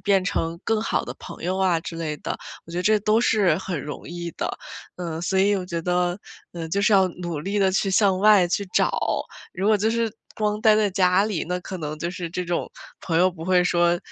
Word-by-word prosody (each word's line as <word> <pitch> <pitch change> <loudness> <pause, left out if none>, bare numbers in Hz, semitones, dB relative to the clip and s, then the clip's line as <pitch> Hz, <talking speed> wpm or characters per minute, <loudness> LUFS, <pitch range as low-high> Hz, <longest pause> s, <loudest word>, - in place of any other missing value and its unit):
变 195 -2 +2
成 165 -3 -2
更 225 -1 +1
好 - - -1
的 - - -6
朋 - - -10
友 185 +2 -1
啊 185 -3 +2
之 165 - -7
类 155 -2 -3
的。 - - -4 0.3
我 165 - -14
觉 175 - -2
得 - - -1
这 215 +1 +4
都 215 +3 +3
是 195 -8 +3
很 185 -4 -4
容 150 - -7
易 170 0 -5
的， - - -3 0.5
嗯， 165 -2 -4
所 190 +2 0
以 200 +2 +4
我 180 -1 -4
觉 170 -2 -3
得， 180 +1 0 0.4
嗯， 165 -1 -5
就 200 - +1
是 205 +1 +4
要 190 -1 +5
努 175 -2 -5
力 195 +7 -2
地 190 -1 +3
去 195 +1 0
向 190 -1 +3
外 200 -3 +5
去 200 +3 0
找， - - +3 0.6
如 190 +3 -2
果 215 - +5
就 220 +3 +1
是 230 -1 0 0.2
光 210 0 -1
待 215 -1 +5
在 210 -2 +2
家 185 +1 +3
里， 205 -7 -2
那 180 0 -1
可 185 0 -7
能 155 -1 -5
就 170 +2 -3
是 180 -2 -5
这 180 +2 -3
种， 175 -1 -2 0.3
朋 165 -2 -2
友 185 +1 +4
不 165 -2 -10
会 180 0 +3
说 175 -1 +2
185 Hz, 255 characters per minute, -24 LUFS, 170-200 Hz, 0.6 s, 要